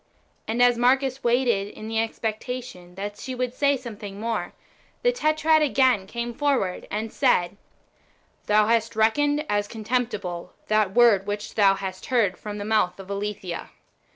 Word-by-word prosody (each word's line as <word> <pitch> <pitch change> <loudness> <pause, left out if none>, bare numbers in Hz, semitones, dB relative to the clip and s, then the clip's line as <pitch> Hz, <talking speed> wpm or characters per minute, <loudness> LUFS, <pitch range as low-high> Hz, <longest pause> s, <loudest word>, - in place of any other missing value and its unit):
And 235 +3 +2
as 245 -1 +4
Marcus 265 +2 +2
waited 235 -4 +2
in 215 +1 -9
the 225 0 -1
expectation 225 -4 -4
that 205 +2 -5
she 260 - -5
would 250 -1 -2
say 280 +1 +2
something 210 -5 -8
more, 230 +1 -3 0.5
the - - +4
Tetrad 315 -7 +2
again 260 -8 +3
came 235 +2 -4
forward 255 -9 0
and 215 +2 -4
said, 175 +2 +2 0.4
" - - -38
Thou 210 0 +4
hast 230 0 +1
reckoned 290 +7 +2
as 205 0 0
contemptible 210 -6 -3 0.2
that 215 -2 +2
word 225 -5 +5
which 205 0 -4
thou 195 -2 +4
hast 190 -1 -6
heard 225 -8 +2
from 210 -1 -7
the 205 - -5
mouth 215 -4 +1
of 195 +1 -9
Aletheia. 200 -3 -4
220 Hz, 155 wpm, -25 LUFS, 200-250 Hz, 0.5 s, word